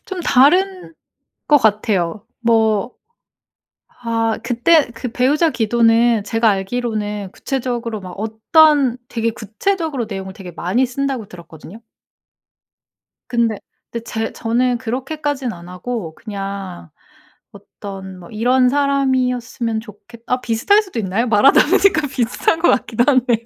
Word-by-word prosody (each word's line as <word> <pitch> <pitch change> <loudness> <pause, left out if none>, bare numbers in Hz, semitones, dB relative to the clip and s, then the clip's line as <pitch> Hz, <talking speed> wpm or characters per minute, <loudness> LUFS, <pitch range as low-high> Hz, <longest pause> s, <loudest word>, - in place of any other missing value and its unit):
좀 380 -5 -5
다른 350 +6 +3 0.5
것 295 - +6
같아요. 210 -4 0 0.2
뭐 225 -1 +1 1.1
아 225 -1 0
그때 265 +4 +3
그 240 +2 -5
배우자 295 +6 +2
기도는 230 -2 +2
제가 225 +1 +1
알기로는 210 -1 -3
구체적으로 240 -4 -3
막 185 -1 -9
어떤 255 +5 +3
"되게 230 -1 -1
구체적으로 275 - -2
내용을 190 -2 -6
되게 185 -2 -10
많이 190 +10 0
쓴다."고 260 -3 -3
들었거든요. 170 +3 -13 1.5
근데 235 -3 +1 0.3
데 235 - -3
제 225 -1 -4
저는 245 +2 0
그렇게까진 265 +1 -3
안 170 0 -12
하고 180 -2 -5
그냥 195 - -7 0.6
어떤 190 -2 -10
뭐 175 - -13
'이런 250 +4 +2
사람이었으면 255 -4 0
좋겠' 225 +1 -15
어 250 0 0
비슷할 250 - +2
수도 375 - -6
있나요? 210 +4 -1
말하다 230 +5 +5
보니까 355 -4 +3
비슷한 255 +5 0
것 345 - +3
같기도 240 0 +1
하네요. 245 -4 +2
235 Hz, 275 characters per minute, -18 LUFS, 210-265 Hz, 1.5 s, 것